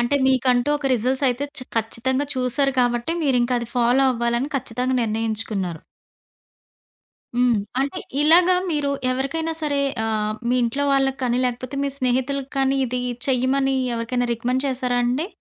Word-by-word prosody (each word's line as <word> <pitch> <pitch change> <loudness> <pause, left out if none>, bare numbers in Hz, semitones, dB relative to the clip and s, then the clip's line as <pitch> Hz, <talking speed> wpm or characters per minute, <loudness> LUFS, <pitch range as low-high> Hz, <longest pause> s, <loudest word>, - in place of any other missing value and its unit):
అంటే, 240 +4 +1
మీకంటూ 255 0 +2
ఒక 280 - -3
రిజల్ట్స్ 255 +4 0
అయితే 250 +3 -1
చ - - -2 0.2
ఖచ్చితంగా 245 +5 -1
చూసారు 260 +2 +1
కాబట్టి 240 +5 0
మీరింకా 250 -3 +2
అది 235 - -6
ఫాలో 245 +3 +3
అవ్వాలని 235 +3 -1
ఖచ్చితంగా 255 0 -2
నిర్ణయించుకున్నారు. 215 -6 -2 1.6
హ్మ్. 245 -3 +3 0.2
అంటే, 275 +1 -1 0.2
ఇలాగా 345 +4 +6 0.2
మీరు 295 -3 0 0.2
ఎవరికైనా 275 +6 -2
సరే 285 -2 0 0.3
ఆహ్, 215 -1 -1 0.2
మీ 245 - +2
ఇంట్లో 255 +5 0
వాళ్ళకి 270 -1 +1
కానీ, 245 -1 +1
లేకపోతే 250 +2 -5
మీ 280 - 0
స్నేహితులకి 260 +2 -1
కానీ 270 0 +2
ఇది 250 +1 -2 0.3
చెయ్యమని 270 +1 +2 0.2
ఎవరికైనా 245 +2 -1
రికమెండ్ 250 +3 -1
చేశారా 250 -2 -1
అండి? 255 +7 0
255 Hz, 140 wpm, -22 LUFS, 240-275 Hz, 1.6 s, ఇలాగా